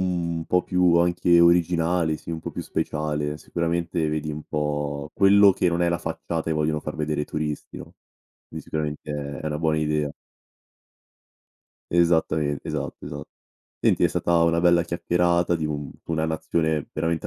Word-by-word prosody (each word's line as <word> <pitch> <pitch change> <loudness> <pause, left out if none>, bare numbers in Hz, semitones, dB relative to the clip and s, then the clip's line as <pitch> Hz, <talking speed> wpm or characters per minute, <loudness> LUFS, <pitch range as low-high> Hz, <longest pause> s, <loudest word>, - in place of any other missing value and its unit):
mhmm, 85 -2 -1
un 80 - -5
po' 90 0 +2
più 90 -2 +3
anche 85 0 +4
originali, 85 -1 +3
sì, - - -9
un 80 -1 -4
po' - - -6
più - - -5
speciale, 75 0 -2
sicuramente 85 0 -1
vedi 75 0 -2
un 75 0 -6
po' 75 -1 -3
quello 100 0 +6
che 90 - +1
non 85 0 0
è 85 - +3
la 85 - +1
facciata 80 -1 -4
e - - +2
vogliono 75 0 0
far 75 - -6
vedere 75 -1 -2
ai 75 - -3
turisti, 75 -1 -4
no, - - -12 0.6
quindi - - -6
sicuramente 75 -1 -4
è 70 -1 -5
è - - -5
una 75 0 -2
buona 80 -1 +1
idea. 75 -1 0 1.8
Esattamen 80 -4 +2
esatto, - - -5
esa - - -6 0.6
Senti - - +2
è - - +5
stata 85 -1 +1
una 85 0 +2
bella 85 -1 +4
chiacchierata 85 0 +1
di 80 -2 -2
un 75 -2 -4
d'una 80 -1 -2
nazione 80 -1 -1
veramente 80 +1 -1
80 Hz, 170 wpm, -24 LUFS, 75-85 Hz, 1.8 s, quello